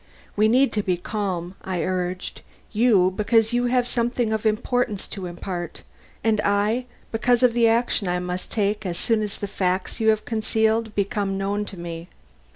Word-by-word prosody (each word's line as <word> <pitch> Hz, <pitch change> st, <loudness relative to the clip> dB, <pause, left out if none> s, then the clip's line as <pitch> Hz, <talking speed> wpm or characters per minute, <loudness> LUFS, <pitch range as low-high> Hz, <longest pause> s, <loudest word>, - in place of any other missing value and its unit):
"We 215 Hz, +1 st, +4 dB
need 260 Hz, +5 st, +4 dB
to 210 Hz, -, +1 dB
be 185 Hz, -3 st, 0 dB
calm," 185 Hz, -2 st, -3 dB
I 185 Hz, -3 st, -2 dB
urged. 185 Hz, 0 st, -3 dB, 0.3 s
"You, 210 Hz, -5 st, +4 dB
because 225 Hz, +2 st, +2 dB
you 245 Hz, 0 st, +2 dB
have 245 Hz, 0 st, +2 dB
something 240 Hz, -2 st, 0 dB
of 220 Hz, 0 st, 0 dB
importance 215 Hz, -1 st, 0 dB
to 190 Hz, -3 st, -5 dB
impart, 175 Hz, -1 st, -6 dB, 0.4 s
and 220 Hz, -2 st, +2 dB
I, 210 Hz, +5 st, +1 dB, 0.3 s
because 240 Hz, +2 st, +2 dB
of 245 Hz, -2 st, +5 dB
the 235 Hz, -1 st, +4 dB
action 225 Hz, -3 st, +1 dB
I 180 Hz, 0 st, +1 dB
must 180 Hz, 0 st, -4 dB
take 210 Hz, 0 st, 0 dB
as 175 Hz, -3 st, -3 dB
soon 225 Hz, +2 st, +1 dB
as 210 Hz, -2 st, -4 dB
the 205 Hz, -, -4 dB
facts 185 Hz, 0 st, -1 dB
you 220 Hz, -1 st, +3 dB
have 215 Hz, -1 st, +2 dB
concealed 220 Hz, 0 st, 0 dB
become 200 Hz, -1 st, -1 dB
known 200 Hz, +2 st, -1 dB
to 195 Hz, -, -8 dB
me. 170 Hz, 0 st, -7 dB
210 Hz, 175 wpm, -24 LUFS, 185-225 Hz, 0.4 s, of